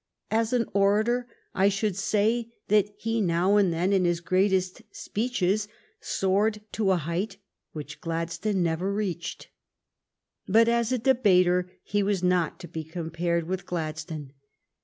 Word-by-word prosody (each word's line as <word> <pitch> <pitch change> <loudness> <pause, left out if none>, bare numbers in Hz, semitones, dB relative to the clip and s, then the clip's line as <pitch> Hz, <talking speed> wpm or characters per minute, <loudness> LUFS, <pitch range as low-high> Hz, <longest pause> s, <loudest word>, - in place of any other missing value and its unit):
As 225 +1 +1
an 245 -2 +2
orator, 215 +5 +2 0.3
I 195 +1 +3
should 200 0 -1
say 215 +4 +1 0.2
that 205 -1 +4
he 225 +1 -1
now 180 +2 +2
and 195 -4 +3
then 175 +4 +1
in 190 -2 +3
his 175 -1 +1
greatest 185 +2 +1
speeches 210 -3 -1 0.3
soared 205 +3 +1
to 210 -3 0
a 190 - +4
height 170 +6 -3 0.4
which 150 0 -8
Gladstone 170 +4 -1
never 170 +4 0
reached. 190 -5 -4 1.0
But 225 +4 +5
as 235 0 +1
a 255 - +2
debater 185 -8 +3
he 205 0 0
was 195 -2 0
not 180 -3 +1
to 175 - -8
be 160 0 -5
compared 170 +1 -2
with 185 0 -4
Gladstone. 155 -4 -5
190 Hz, 140 wpm, -27 LUFS, 170-215 Hz, 1.0 s, But